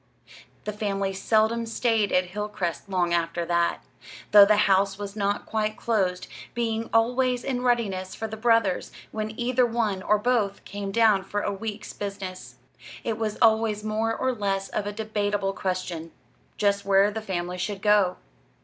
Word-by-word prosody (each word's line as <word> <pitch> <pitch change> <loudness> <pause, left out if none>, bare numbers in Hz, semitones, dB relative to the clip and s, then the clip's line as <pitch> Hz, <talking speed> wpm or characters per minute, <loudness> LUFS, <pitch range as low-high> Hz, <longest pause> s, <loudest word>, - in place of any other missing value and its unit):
The 210 - -4
family 200 -2 -2
seldom 220 +3 +1
stayed 225 -3 +1
at 180 0 +2
Hilcrest 205 -3 -4
long 175 -2 +1
after 170 0 0
that, 170 0 0 0.5
though 205 -1 +10
the 210 0 +4
house 195 0 +3
was 205 0 -6
not 205 -1 -1
quite 215 -1 -1
closed, 190 -6 0 0.3
being 225 -1 -1
always 245 +2 +2
in 255 -2 -2
readiness 210 -7 0
for 220 - -4
the 220 - -6
brothers 225 -4 +2 0.2
when 215 +1 -4
either 250 +1 +2
one 225 -5 0
or 210 +2 +3
both 210 -3 0
came 200 -1 -5
down 215 -3 +4
for 205 +2 -3
a 205 - -1
week's 215 +1 -6
business. 195 -2 -6 0.5
It 225 -2 -2
was 215 -2 -2
always 220 -2 +3
more 220 +1 -1
or 260 0 0
less 195 -3 -2
of 205 - -2
a - - -2
debatable 205 -2 -1
question 180 -4 -3 0.5
just 200 -1 +1
where 200 +1 +4
the 220 +1 -4
family 180 -3 -3
should 195 +1 -3
go. 205 -3 +4
205 Hz, 160 wpm, -26 LUFS, 195-225 Hz, 0.5 s, though